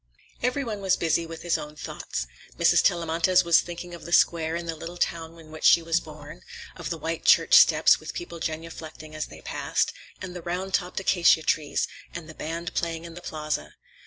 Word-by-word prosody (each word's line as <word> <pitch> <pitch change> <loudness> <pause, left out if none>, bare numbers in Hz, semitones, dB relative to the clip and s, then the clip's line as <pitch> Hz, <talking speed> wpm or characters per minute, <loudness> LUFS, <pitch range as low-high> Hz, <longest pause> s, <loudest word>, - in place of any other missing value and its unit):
Every 250 +3 0
one 215 -5 -5
was 190 -1 +2
busy 165 0 0
with 165 0 -9
his 175 -1 +1
own 150 0 -8
thoughts. - - -5 0.3
Mrs. - - +5
Tellamantez 170 +2 +2
was 170 -1 +5
thinking 175 0 -8
of 170 - -9
the 170 - -8
square 165 -1 +3
in 170 0 -4
the 165 -1 -3
little 170 +2 -8
town 165 -1 -2
in 160 -1 -14
which 155 - -10
she 170 - +6
was 165 0 +1
born; 155 +1 -11 0.3
of 165 -3 -6
the 165 - -3
white 160 +1 -4
church - - +5
steps, 485 0 +7
with - - -8
people 350 - -6
genuflecting 160 -1 -6
as 155 0 -4
they - - -13
passed, - - -1 0.3
and 185 -1 -7
the 175 - -6
round 185 +3 -4
topped 180 0 0
acacia 175 -4 +4
trees, 155 -2 0 0.3
and 170 -2 -6
the 160 - -10
band 170 +3 -5
playing 165 -1 -2
in 170 - -9
the 175 - -10
plaza. 150 - -4
165 Hz, 205 wpm, -26 LUFS, 160-175 Hz, 0.3 s, steps